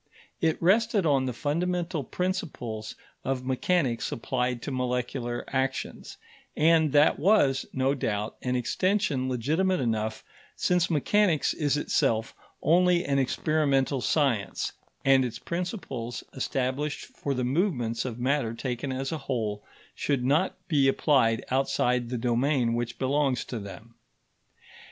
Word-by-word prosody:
It 160 -1 +1
rested 205 +2 +3
on 135 -4 +2
the - - -1
fundamental 170 +4 -1
principles 150 - -4 0.3
of 130 -1 -2
mechanics 130 -1 0
applied 125 0 -2
to - - -4
molecular 125 -1 -2
actions; 135 0 -3 0.4
and 160 -1 +4
that 145 +1 +5
was, 145 -8 +3
no 130 +1 +1
doubt, 110 -5 -2
an 125 0 -1
extension 135 - 0
legitimate 160 +10 +1
enough, 110 -3 -1 0.3
since 180 -1 +1
mechanics 170 +1 +2
is 145 -2 0
itself 115 -6 0 0.3
only 175 +1 +4
an 140 -1 +1
experimental 140 -1 +1
science, 125 -8 0 0.3
and 135 -1 +5
its 120 -2 -3
principles, 160 - -4
established 135 +2 -2
for 140 -1 -4
the 125 - -1
movements 125 - 0
of 120 -3 -5
matter 125 -2 0
taken 125 +2 -3
as 135 +1 -3
a 160 - -3
whole, 110 -7 -3 0.3
should 135 -4 -1
not 155 +8 +2
be 140 -4 +3
applied 130 -5 +2
outside 125 -2 +1
the 125 - -2
domain 120 +1 +1
which 120 0 -3
belongs 135 0 +1
to 120 - -5
them. 110 +3 -10
135 Hz, 130 wpm, -27 LUFS, 125-155 Hz, 0.4 s, that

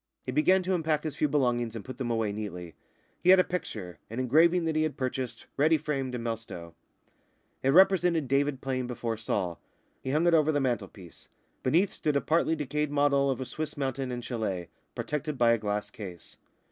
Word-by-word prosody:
He 130 - -4
began 185 +7 +4
to 185 +1 0
unpack 160 -3 0
his 155 -3 -4
few 150 - +1
belongings 120 -5 0
and 110 - -6
put 130 0 -8
them 125 -2 -2
away 115 -3 0
neatly. 90 -5 -6 0.5
He 180 - +2
had 190 - +9
a 185 - +5
picture 105 - -5
an 115 +3 -5
engraving 165 +7 +4
that 160 -1 0
he 155 - +2
had 155 -1 -1
purchased, 130 -1 -3
ready 155 +3 +4
framed, 135 -4 -3
in 120 - -4
Melstowe. 115 -8 -5 0.9
It 135 - +1
represented 175 -2 +5
David 140 0 +1
playing 130 -2 -2
before 120 -2 -3
Saul. 95 -6 -2 0.4
He - - -5
hung 155 +5 +2
it 175 - +4
over 155 -1 +4
the 145 - +1
mantelpiece. 105 - -4 0.3
Beneath 170 +9 +2
stood 150 -2 -1
a 140 - +3
partly 160 +3 +2
decayed 150 0 -2
model 140 -1 +3
of 135 - -1
a 130 - -3
Swiss 155 +3 -5
mountain 135 -1 -2
and 120 -1 -4
châlet, 105 -8 -3 0.3
protected 150 -1 -3
by 120 -1 +5
a 115 - +2
glass 105 -1 -2
case. 90 -5 -9
135 Hz, 195 wpm, -29 LUFS, 115-155 Hz, 0.9 s, had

